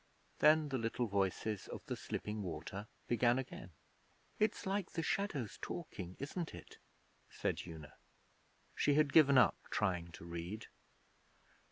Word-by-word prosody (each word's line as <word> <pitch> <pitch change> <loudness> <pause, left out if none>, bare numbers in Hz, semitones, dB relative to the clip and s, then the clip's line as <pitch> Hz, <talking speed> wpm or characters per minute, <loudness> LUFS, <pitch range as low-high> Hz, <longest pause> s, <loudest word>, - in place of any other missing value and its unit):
Then 155 0 +6
the 130 -2 0
little 115 +2 0
voices 100 0 0
of - - -7
the - - -2
slipping 105 0 -4
water 95 +4 -5 0.2
began 120 +1 +4
again. 130 -7 -5 0.7
'It's 215 0 +1
like 195 -1 -1
the 165 - -1
shadows 145 - -1
talking, 95 - -5
isn't 160 +5 -4
it?' - - -12 0.5
said - - -1
Una. 80 -3 -9 0.8
She 145 - +3
had 150 -2 +4
given 140 -4 +8
up 125 - +6
trying 90 -5 0
to 85 - -9
read. 85 +5 -5
115 Hz, 135 wpm, -37 LUFS, 95-150 Hz, 0.8 s, given